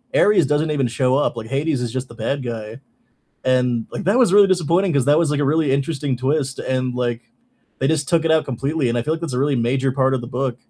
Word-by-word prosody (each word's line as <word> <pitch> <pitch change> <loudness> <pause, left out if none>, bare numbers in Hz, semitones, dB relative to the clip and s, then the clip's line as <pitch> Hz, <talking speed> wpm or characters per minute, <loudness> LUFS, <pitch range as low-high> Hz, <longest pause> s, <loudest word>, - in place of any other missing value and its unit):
Ares 205 -6 +4
doesn't 150 +2 0
even 135 -4 0
show 125 +2 0
up, 145 - 0
like, 115 -1 -7
Hades 140 +1 -1
is 120 - -3
just 130 +1 -4
the 115 - -14
bad 140 +2 -3
guy, 115 -1 -6 0.7
and, 125 -3 +1
like, - - -6
that 200 +8 +2
was 240 -8 +4
really 200 0 +6
disappointing 180 +1 +1
'cause 140 -4 +1
that 145 +2 +4
was, 165 -3 +1
like, 145 -1 0
a - - +1
really 150 +1 +1
interesting 140 -1 -1
twist, 135 +1 -1
and, 130 -1 -2
like, 120 -2 -2 0.6
they 135 - 0
just 150 -3 0
took 165 -1 +2
it 160 - +1
out 160 -1 +3
completely, 135 +2 -2
and 120 - -1
I 120 - 0
feel 155 +4 -1
like 165 - -6
that's 165 -5 -4
a 125 - -1
really 140 0 +1
major 130 +3 0
part 130 0 +1
of 130 - -1
the 120 - -8
book. 125 -1 -2
135 Hz, 260 wpm, -20 LUFS, 125-155 Hz, 0.7 s, really